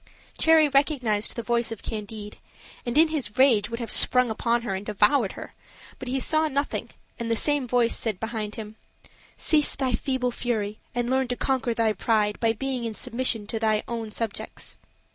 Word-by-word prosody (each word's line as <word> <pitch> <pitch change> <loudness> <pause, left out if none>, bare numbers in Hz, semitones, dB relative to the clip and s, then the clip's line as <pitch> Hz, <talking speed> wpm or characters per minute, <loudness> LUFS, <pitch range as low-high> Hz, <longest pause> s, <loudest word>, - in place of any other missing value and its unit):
Cherry 320 -1 +5
recognized 270 -7 +1
the 235 - -4
voice 235 0 0
of 225 - -7
Candide, 210 -1 -6 0.5
and 240 +4 -1
in 320 +1 +6
his 270 -10 -3
rage 240 -6 +4
would 230 0 -5
have 235 - -3
sprung 250 -2 +6
upon 235 +2 0
her 200 - -3
and 190 +1 -4
devoured 210 +2 +2
her; - - -10 0.5
but 260 - -7
he 265 +2 -1
saw 315 +3 +2
nothing 280 0 -2 0.3
and 235 -1 -3
the 230 - +2
same 290 +1 +1
voice 240 -1 +2
said 215 -5 -2
behind 220 -2 -4
him: 220 0 -8 0.6
"Cease 300 -2 +2
thy 260 -3 -1
feeble 255 0 -1
fury, 215 -4 -3 0.2
and 240 -1 -1
learn 265 0 +1
to 245 - -2
conquer 250 -3 -1
thy 225 -1 +2
pride 210 0 0
by 230 -1 +2
being 255 +2 -3
in 225 -2 -4
submission 240 -3 0
to 225 +2 -3
thine 215 -1 +1
own 230 -2 -5
subjects." 225 -2 -5
235 Hz, 185 wpm, -25 LUFS, 215-260 Hz, 0.6 s, in